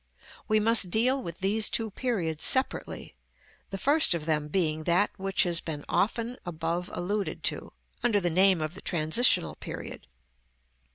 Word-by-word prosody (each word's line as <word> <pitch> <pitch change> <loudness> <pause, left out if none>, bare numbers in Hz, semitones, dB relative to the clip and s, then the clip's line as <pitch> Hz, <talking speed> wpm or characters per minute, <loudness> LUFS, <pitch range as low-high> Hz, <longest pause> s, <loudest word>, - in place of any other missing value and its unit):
We 215 0 +2
must 220 -3 +4
deal 250 +7 +1
with 170 -3 -8
these 210 +3 +2
two 225 -2 -2
periods 185 -10 -2
separately; 260 +1 0 0.6
the 195 - -5
first 285 - +3
of 155 -3 -5
them 150 -2 0
being 155 -2 -1
that 180 +4 +2
which 195 -1 0
has 175 -2 +1
been 150 -3 -6
often 230 +4 -1
above 170 +1 -4
alluded 200 +3 -4
to, - - -10 0.3
under 225 -4 +2
the 175 -3 -1
name 185 0 +4
of 155 +1 -4
the 190 - -11
transitional 155 - +2
period. - - -9
190 Hz, 155 wpm, -27 LUFS, 165-220 Hz, 0.6 s, must